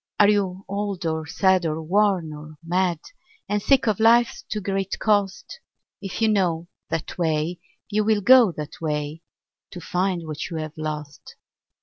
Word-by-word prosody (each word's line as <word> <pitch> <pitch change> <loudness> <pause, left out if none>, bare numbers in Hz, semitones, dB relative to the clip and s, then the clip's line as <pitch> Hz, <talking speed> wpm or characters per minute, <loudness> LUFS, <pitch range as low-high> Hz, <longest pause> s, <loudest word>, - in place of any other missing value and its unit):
Are 205 -1 +7
you 195 -2 0
old 200 -2 -3
or 160 -1 -2
sad 190 +3 +2
or 160 -1 -1
worn 185 -2 +1
or 150 +1 -10
mad, 175 0 +1 0.5
And 210 0 0
sick 265 +2 +3
of 215 -2 +1
life's 230 +2 +4
too 215 - -1
great 195 -1 -2
cost? 205 - 0 0.4
If 195 +3 -4
you - - +5
know 175 -5 +1 0.2
that 165 +2 -4
way, 160 +1 0 0.3
you 210 0 0
will 215 -1 +2
go 245 -1 +7
that 150 0 -8
way, 150 0 -3 0.5
To 180 - -8
find 180 0 -1
what 155 -2 -5
you 165 - -4
have 155 -1 -5
lost. 150 -2 -6
185 Hz, 160 wpm, -23 LUFS, 160-205 Hz, 0.5 s, Are